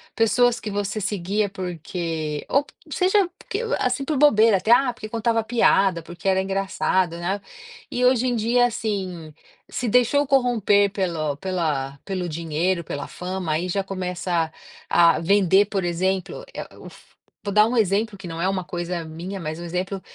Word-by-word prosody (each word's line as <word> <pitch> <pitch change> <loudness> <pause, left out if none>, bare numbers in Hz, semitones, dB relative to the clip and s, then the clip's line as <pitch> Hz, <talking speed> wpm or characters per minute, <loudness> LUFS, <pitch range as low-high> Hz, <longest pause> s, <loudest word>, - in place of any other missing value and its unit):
pessoas 240 +1 +3
que 215 - -5
você 205 +1 -2
seguia 200 +1 -1
porque 165 -4 -4
ou 280 - +2
p - - -21 0.2
seja, 380 +1 +3
porque, 405 - -4
ah, 465 - 0
assim, 255 +2 -2
por 305 - -1
bobeira 225 -7 +5
até: 200 +5 0
"Ah, 245 +1 +5
porque 215 -3 -9
contava 230 0 0
piada, 195 -6 +3
porque 175 +3 -8
era 190 0 +3
engraçado", 190 -2 0
né, 190 +4 -2 0.5
e 250 0 0
hoje 255 0 +3
em 245 - +1
dia, 235 +2 +3
assim, 190 -8 -4 0.3
se 250 - -3
deixou 250 +5 +3
corromper 225 -7 +3
pelo 170 -7 -1
pela 155 -7 -2
pelo 185 -3 -3
dinheiro, 170 +3 -1
pela 145 -2 -5
fama, 180 -2 -4
aí 165 +4 -1
já 195 +2 0
começa 180 -3 -2 0.4
a 170 -1 +5
vender, 195 +2 +4
por 200 -2 -2
exemplo, 185 - -1
eh, - - -8
o - - -13
uf - - -16 0.3
vou 200 - -3
dar 210 +1 +6
um 245 - -2
exemplo 210 -1 +1
que 190 - -11
não 165 -1 -6
é 185 - +1
uma 190 -1 -1
coisa 175 -1 -4
minha, 170 +5 -7
mas 155 -1 -5
um - - -7
exemplo 185 +3 -3
195 Hz, 175 wpm, -23 LUFS, 175-225 Hz, 0.5 s, dar